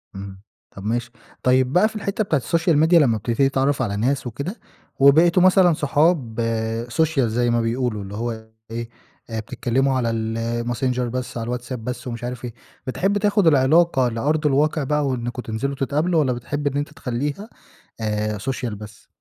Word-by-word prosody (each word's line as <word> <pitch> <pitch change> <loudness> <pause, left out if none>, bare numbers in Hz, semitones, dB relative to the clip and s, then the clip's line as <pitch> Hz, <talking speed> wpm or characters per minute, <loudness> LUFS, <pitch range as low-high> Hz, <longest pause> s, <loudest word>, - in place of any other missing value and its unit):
إمم، 95 -1 -8 0.3
طَب 100 - -10
ماشي. 120 +3 -2 0.3
طيب 130 +1 +3
بقى 185 +4 +5
في - - -15
الحِتّة 205 0 -1
بتاعة 160 -8 +1
الSocial 165 +5 +1
Media 175 - +1
لما 135 -9 +5
بتبتدي 120 +5 +1
تتعرَّف 135 +1 +1
على 105 -5 -1
ناس 130 +5 0
وكده، 140 - -5 0.4
وبقيتوا 165 +6 +6
مثلًا 185 -2 +5
صحاب 150 -4 +1
آآ 115 0 -1
social 160 +1 +1
زي 120 0 +1
ما 120 0 +2
بيقولوا، 115 -2 -1
اللي 100 +1 -8
هو 110 0 -4 0.2
إيه 115 0 -4 0.4
آآ، 115 -1 -3
بتتكلّموا 130 +4 0
على 120 -2 0 0.5
الMessenger 125 +1 -1
بس، 125 0 -3
على 120 +2 -2
الWhatsApp 125 +2 -8
بس 125 +1 -6
ومش 115 -1 -5
عارف 125 0 -5
إيه، 120 - -6 0.3
بتحب 195 +10 0
تاخُد 205 -2 +2
العلاقة 145 -1 +4
لأرض 150 +7 -1
الواقِع 150 +2 +2
بقى 150 +1 0
وإنكم 120 -1 -3
تنزِلوا 125 +5 -3
تتقابلوا، 150 +5 +1
والّا 135 -4 +2
بتحب 145 +5 -3
إن 140 0 -1
أنت 145 +1 -3
تخلّيها 145 - -4 0.5
آآ 105 -1 -1
social 125 +3 -3
بس؟ 105 0 -12
130 Hz, 170 wpm, -22 LUFS, 115-150 Hz, 0.5 s, وبقيتوا